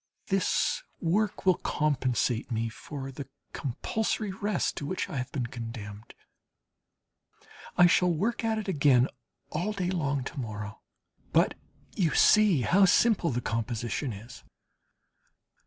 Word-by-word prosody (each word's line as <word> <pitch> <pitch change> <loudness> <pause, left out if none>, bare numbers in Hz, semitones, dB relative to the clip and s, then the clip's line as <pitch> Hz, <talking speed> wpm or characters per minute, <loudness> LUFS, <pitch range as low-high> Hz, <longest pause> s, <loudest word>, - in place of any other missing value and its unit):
This 195 - +1 0.2
work 205 +6 0
will 185 -1 +5
compensate 130 -5 0
me 115 0 -1
for 135 +4 -7
the 135 +1 -7 0.3
compulsory 210 - -2
rest 200 0 -1
to 145 - -4
which 185 - -2
I - - -5
have 125 +1 -3
been 130 -4 -2
condemned. 115 -3 -8 1.6
I 175 - +8
shall 180 +1 +4
work 215 +9 -1
at 225 -1 +1
it 215 -1 -4
again 140 -7 +4 0.4
all 180 +7 -1
day 185 -3 -1
long 145 -6 -1
to 135 - -6
morrow; 105 -2 -6 0.5
but - - +3 0.4
you 170 -6 +1
see 210 -9 +5
how 190 - +5
simple 200 -2 +3
the 125 -3 -1
composition 115 +3 -2
is. 110 +4 -10
145 Hz, 130 wpm, -28 LUFS, 120-190 Hz, 1.6 s, I